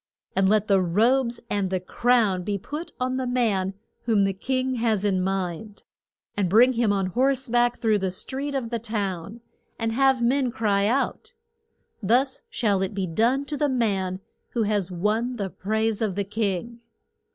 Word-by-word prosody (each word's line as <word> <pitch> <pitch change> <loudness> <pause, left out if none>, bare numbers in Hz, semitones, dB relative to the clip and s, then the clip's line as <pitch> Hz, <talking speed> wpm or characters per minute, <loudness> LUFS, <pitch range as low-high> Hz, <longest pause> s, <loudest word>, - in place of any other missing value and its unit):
And 190 0 +3
let 215 0 +3
the 195 -2 +4
robes 235 +7 +2
and 200 -3 -1
the 185 0 0
crown 220 -1 +2
be 200 +2 -2
put 300 - -7
on 255 0 -1
the 260 -1 -2
man 205 -6 0 0.3
whom 220 -4 +3
the 195 0 +1
king 255 +5 -1
has 220 -3 +1
in 190 -2 +1
mind, 190 +2 -3 0.5
and 195 -3 0
bring 240 +7 +6
him 230 -3 +2
on 195 -1 +1
horse 260 +7 +1
back 240 0 +2
through 220 -3 +2
the 190 -1 -1
street 270 +9 -4
of 245 -4 -3
the 235 - -1
town, 205 -2 -4 0.4
and 225 -1 -1
have 265 0 +3
men 260 +2 +2
cry 205 -5 +1
out, 275 - -1 0.7
Thus 250 +6 +2
shall 205 -5 0
it 190 +1 -2
be 195 -2 -1
done 235 +11 +1
to 295 - -4
the 290 0 +1
man 195 -7 -1 0.3
who 235 - +1
has 205 -3 0
won 215 +7 -1
the 200 -5 -4
praise 220 +2 -1
of 210 -5 0
the 200 - 0
king. 210 +2 -2
220 Hz, 175 wpm, -25 LUFS, 195-245 Hz, 0.7 s, bring